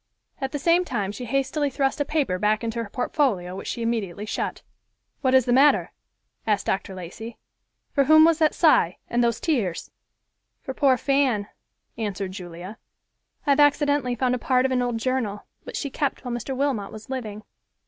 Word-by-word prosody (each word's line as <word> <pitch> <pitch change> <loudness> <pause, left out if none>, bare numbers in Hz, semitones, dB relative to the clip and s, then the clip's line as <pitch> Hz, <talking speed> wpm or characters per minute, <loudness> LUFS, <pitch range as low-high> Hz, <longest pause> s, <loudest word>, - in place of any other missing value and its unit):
At 270 -1 -3
the 290 - -2
same 335 +5 +3
time 210 - -2
she 245 +4 -7
hastily 275 +4 0
thrust 275 +1 0
a - - +1
paper 275 -14 0
back 210 +2 +1
into 230 0 -2
her 210 - -9
portfolio, 210 - 0
which 195 - -7
she 235 - -3
immediately 210 -4 -2
shut. - - -3 0.6
"What 260 -2 +3
is 260 -2 +5
the 245 - +2
matter?" 280 +3 +4 0.6
asked 205 -2 +1
Dr. 195 0 -2
Lacey. 195 +6 -8 0.5
"For 280 -2 +2
whom 310 +2 +7
was 330 -1 +3
that 310 -2 +3
sigh 245 - +4
and 240 0 +2
those 235 -2 +1
tears?" 225 - -1 0.7
"For 265 - -5
poor 265 -2 +3
Fan," 260 -7 +1 0.5
answered 200 -3 -3
Julia. 180 +2 -9 0.7
"I 285 - +3
have 280 - +3
accidently 285 -3 +3
found 250 +1 +1
a 250 - -1
part 255 +1 +2
of 265 - +1
an 255 -1 +1
old 245 -2 -1
journal, 225 -4 -2 0.2
which - - -6
she 280 - -3
kept 280 -1 -2
while 245 - -3
Mr. 255 +2 -4
Wilmot 260 -8 -1
was 215 +3 -10
living." 215 -5 -5
245 Hz, 185 wpm, -24 LUFS, 210-275 Hz, 0.7 s, whom